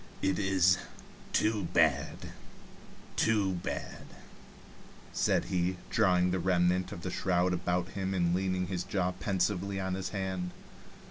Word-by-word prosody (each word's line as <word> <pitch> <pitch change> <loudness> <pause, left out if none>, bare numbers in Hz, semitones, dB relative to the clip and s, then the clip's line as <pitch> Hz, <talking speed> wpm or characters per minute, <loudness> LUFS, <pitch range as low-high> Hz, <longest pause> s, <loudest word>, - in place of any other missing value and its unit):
"It 95 0 +1
is 95 -2 +4 0.5
too 105 -3 +1
bad, - - +2 0.9
too 105 -4 +2
bad," - - -5 1.1
said - - +2
he, 90 +1 0
drawing 90 0 +3
the 95 - 0
remnant 90 0 +2
of 85 - -7
the 90 - -3
shroud 90 0 +1
about 90 0 -1
him 95 0 -3
and 85 -2 +2
leaning 95 0 0
his 90 -1 -3
jaw 90 -2 0
pensively 95 +1 -1
on 95 -1 -2
his 95 0 -3
hand. 95 -2 -3
95 Hz, 130 wpm, -31 LUFS, 90-95 Hz, 1.1 s, is